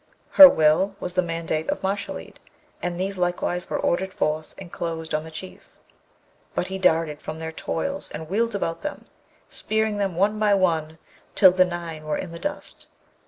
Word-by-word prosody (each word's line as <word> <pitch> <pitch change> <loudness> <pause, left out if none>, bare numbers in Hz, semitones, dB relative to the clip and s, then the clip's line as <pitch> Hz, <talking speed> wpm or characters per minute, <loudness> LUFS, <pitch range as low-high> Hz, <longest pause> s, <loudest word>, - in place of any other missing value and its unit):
Her 285 -1 +11
will 160 +3 +3
was 180 - -4
the 185 - +3
mandate 165 -2 -3
of - - -2
Mashalleed, 200 +1 -4 0.4
and 175 0 -3
these 190 0 -3
likewise 180 0 -1
were - - -1
ordered 190 +2 0
forth, 155 +1 -2
and 185 -3 -10
closed 160 -1 -4
on 155 +1 -1
the - - -8
Chief, 170 +4 -11 0.8
but 180 - -1
he 190 0 -4
darted 160 -4 +2
from 155 - -6
their 160 0 -5
toils 280 - -2
and 160 +1 -7
wheeled 225 +5 0
about 165 -4 -2
them, 300 - -6 0.5
spearing 220 -1 -1
them 195 -4 -1
one 205 +4 +1
by 210 -1 +4
one 160 -4 0 0.4
till 190 -3 +7
the 185 0 +4
nine 170 -3 -6
were 155 - -1
in 175 - -6
the 170 - -8
dust. 295 0 -5
175 Hz, 180 wpm, -24 LUFS, 160-195 Hz, 0.8 s, Her